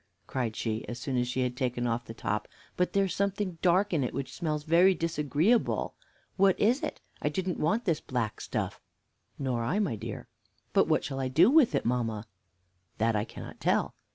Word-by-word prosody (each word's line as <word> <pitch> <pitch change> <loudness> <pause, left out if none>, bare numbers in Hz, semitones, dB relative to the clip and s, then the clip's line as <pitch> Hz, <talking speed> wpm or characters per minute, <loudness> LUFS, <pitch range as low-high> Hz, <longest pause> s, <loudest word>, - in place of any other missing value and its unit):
cried 120 -4 -2
she, 110 -1 -2
as 120 - -5
soon 130 +1 -3
as 125 0 +1
she 125 +1 -1
had 125 -1 -1
taken 125 -1 -1
off 120 0 -1
the 115 - -8
top, 105 -1 -2 0.3
"but 180 - 0
there's 195 -2 +2
something 200 -3 -1
dark 185 +3 +3
in 150 -5 +2
it 125 - -3
which 135 -1 -4
smells 155 -3 -2
very 175 +4 +5
disagreeably. 165 - +1 0.5
What 195 -1 +4
is 240 +7 +3
it? - - -4 0.2
I - - +1
didn't 185 -2 -2
want 210 +10 +1
this 165 -5 +1
black 120 -4 -2
stuff." - - -3 0.6
"Nor 125 -4 -1
I, 135 - 0
my 195 - +1
dear." 100 - -6 0.5
"But - - +4
what - - +2
shall 135 -1 -4
I 130 - 0
do 165 - +5
with 280 - +5
it, - - 0
mamma?" 115 -3 -1 0.7
"That 115 +1 +2
I 105 0 +1
cannot - - -10
tell." - - +1
145 Hz, 195 wpm, -29 LUFS, 120-185 Hz, 0.7 s, very